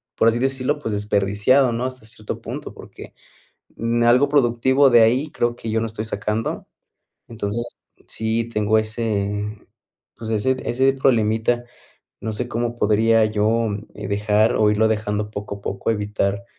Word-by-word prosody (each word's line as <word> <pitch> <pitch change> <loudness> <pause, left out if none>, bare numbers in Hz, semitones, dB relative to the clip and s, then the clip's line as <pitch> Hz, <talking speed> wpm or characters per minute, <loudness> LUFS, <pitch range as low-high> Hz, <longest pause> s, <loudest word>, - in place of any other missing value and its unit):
por 115 - +3
así 115 +1 0
decirlo, 135 +2 0
pues 110 -7 -4
desperdiciado, 105 +5 +2
¿no? 120 +2 -2
Hasta 130 -3 -6
cierto 110 -2 -7
punto, - - -7
porque - - -12 0.6
em, 115 +1 0
algo 125 +4 +5
productivo 130 0 +3
de 120 -1 +7
ahí 130 +7 +2
creo 120 0 -1
que 115 - -6
yo 110 0 +1
no - - -1
estoy 110 0 -5
sacando. 105 +1 -3 0.6
Entonces 115 +1 -4 0.3
sí 115 +1 -2
tengo 105 +1 +2
ese, 105 -2 -2 0.6
pues 110 -1 -7
ese 120 +5 +1
ese 130 +3 +2
problemita. 120 -2 +1 0.6
No 110 -1 -3
sé 120 +3 -3
cómo 120 0 -2
podría 110 +1 +3
yo 110 +2 +1 0.3
dejar 105 +2 +1
o 105 -1 +4
irlo 110 +1 +3
dejando 105 -1 -1
poco 100 -1 -6
a - - -18
poco 100 +3 -2
evitar 105 -1 -1
110 Hz, 150 wpm, -21 LUFS, 105-120 Hz, 0.6 s, de